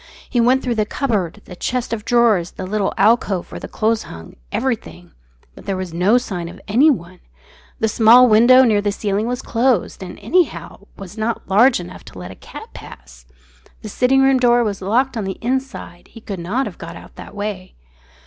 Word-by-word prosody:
He 240 - 0
went 255 +3 +3
through 245 - -1
the 215 -2 0
cupboard, 210 - -2
the 180 - -10
chest 245 +5 -3
of 215 -2 -4
drawers, 230 -8 +2
the 185 - -6
little 200 +1 -1
alcove 200 -3 +1
where - - -7
the - - -8
clothes 220 0 0
hung 80 0 -11 0.2
everything. 90 - -4 0.4
But - - -15
there 195 -1 -1
was 185 -3 -6
no 190 +8 +3
sign 180 -8 -4
of 180 +3 -12
anyone. 215 - +2 0.6
The 220 - +1
small 230 +3 +6
window 240 +4 +6
near 215 -4 +2
the 205 0 -1
ceiling 205 +1 -2
was 250 +1 -3
closed; 235 -5 0
and, 185 - -8
anyhow, 340 - -1
was 195 +2 -10
not 225 +1 -3
large 235 +5 +4
enough 175 +1 -10
to - - -13
let 90 +1 -8
a - - -11
cat - - -12
pass. - - -13 0.6
The 215 - -6
sitting 265 +5 +2
room 270 -1 +4
door 240 -1 +4
was 205 -3 -3
locked 245 +7 0
on 220 - -2
the 190 0 -5
inside; 255 -8 -4
he 230 - -14
could 200 -4 -7
not 215 +11 -2
have - - -8
got - - -8
out - - -14
that - - -11
way. 205 -3 -6
215 Hz, 195 wpm, -19 LUFS, 185-245 Hz, 0.6 s, small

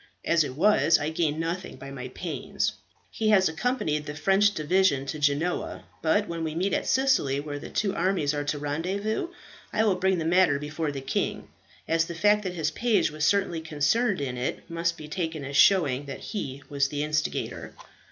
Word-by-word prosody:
As 170 -2 +4
it 130 -3 -5
was 170 -1 +4
I 150 - -2
gained 160 -2 0
nothing 170 +3 -3
by 135 +1 -9
my 130 -2 -6
pains. 190 +8 -3 0.4
He 220 -1 0
has 195 -3 +5
accompanied 160 - -1
this 150 0 -5
French 195 +6 +4
division 155 -3 +2
to 150 +2 -4
Genoa; 145 +5 0 0.2
but 205 +6 +2
when 170 -1 -4
we 160 -1 -3
meet 190 +4 0
at - - 0
Sicily, 260 - +2
where 145 0 -5
the - - -8
two 200 -2 0
armies 170 -5 +1
are 145 0 -2
to 145 +1 -1
rendezvous, 185 - -2 0.4
I 220 - +2
will 210 -3 +3
bring 185 +1 +1
the 160 - -2
matter 175 -3 +4
before 150 +1 -3
the 135 -1 -5
king, 135 - -2 0.4
as 165 0 +2
the 170 - -7
fact 210 +4 +4
that 180 -1 -3
his 160 -2 -1
page 225 -1 +1
was 155 0 -1
certainly 190 -4 +1
concerned 165 +6 +1
in 130 -3 -3
it 125 - -3
must 170 0 -1
be 155 -2 -9
taken 160 -2 -3
as 140 +1 -5
showing 145 -7 +4
that 135 - -7
he 140 - -5
was 140 -1 +1
the 145 +1 -2
instigator." 150 0 -2
160 Hz, 195 wpm, -27 LUFS, 145-190 Hz, 0.4 s, has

